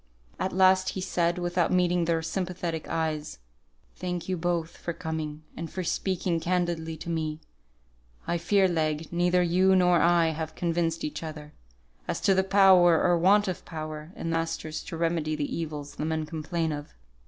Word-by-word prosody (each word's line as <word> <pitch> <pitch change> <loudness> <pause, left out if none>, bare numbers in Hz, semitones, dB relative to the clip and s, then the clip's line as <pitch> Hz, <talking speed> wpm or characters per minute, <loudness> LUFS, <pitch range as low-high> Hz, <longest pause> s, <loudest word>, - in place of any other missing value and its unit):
At 190 - -1
last 185 0 +4
he - - -1
said, 175 -2 0
without 175 -1 0
meeting 180 -1 +2
their 165 -1 0
sympathetic 175 -1 -3
eyes, 155 - -2 0.6
"Thank 180 -2 -4
you 185 - 0
both 170 -1 -2
for 170 - -5
coming, 160 -2 -5
and 165 0 -5
for 185 - -3
speaking 180 -1 -1
candidly 170 -2 -1
to 170 - -7
me. 155 -2 -2 0.9
I 170 - -1
fear, 195 +3 +3
Legh, 160 -2 -1
neither 175 +1 +2
you 185 +2 +4
nor 180 -2 +4
I 170 -1 +4
have 160 0 -4
convinced 165 -1 -1
each 150 - -4
other, 150 -2 -8 0.5
as - - -2
to 195 - +4
the 190 0 +3
power, 190 -4 +6
or 175 -1 +3
want 205 +4 +4
of 185 - -3
power, 155 0 -7
in 165 - -4
the 165 - +1
masters 165 -1 -3
to 165 - -6
remedy 165 -2 0
the 150 -1 -3
evils 150 -3 -5
the 150 - -4
men 160 0 -1
complain 160 +1 -2
of." 145 0 -7
170 Hz, 175 wpm, -27 LUFS, 160-180 Hz, 0.9 s, power